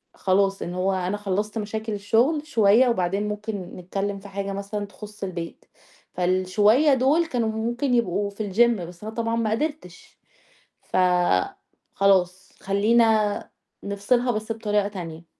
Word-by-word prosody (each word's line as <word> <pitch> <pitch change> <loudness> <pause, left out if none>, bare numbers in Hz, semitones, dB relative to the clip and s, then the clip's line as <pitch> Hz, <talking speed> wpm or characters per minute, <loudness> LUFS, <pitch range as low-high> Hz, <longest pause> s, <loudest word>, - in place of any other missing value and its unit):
خلاص، 195 +1 +1
إن 175 - -4
هو 190 +1 0
أنا 185 +2 -1
خلّصت 205 +2 -2
مشاكل 220 +1 -4
الشغل 235 +10 +1
شوية 230 0 +4
وبعدين 195 0 0
ممكن 210 +1 -4 0.2
نتكلّم 195 +2 -3
في 200 - -12
حاجة 200 0 -4
مثلًا 200 +1 -4
تخُص 210 0 -11
البيت، 170 -3 -6 0.5
فالشوية 185 - +3
دُول 275 +6 +3
كانوا 235 -7 -1
ممكن 240 +4 -1
يبقوا 205 -3 +1
في 205 -1 -5
الGym 235 -2 +4
بس 175 +3 -10
أنا 220 +1 -6
طبعًا 230 0 -1
ما 225 -2 0
قدرتش، 285 - -4 0.6
ف - - -4 1.0
خلاص 190 -1 +1
خلّينا 215 +1 +2 0.3
نفصلها 240 +5 0
بس 215 0 -4
بطريقة 210 -2 0
تانية. 170 -4 -8
205 Hz, 135 wpm, -24 LUFS, 195-225 Hz, 1.0 s, شوية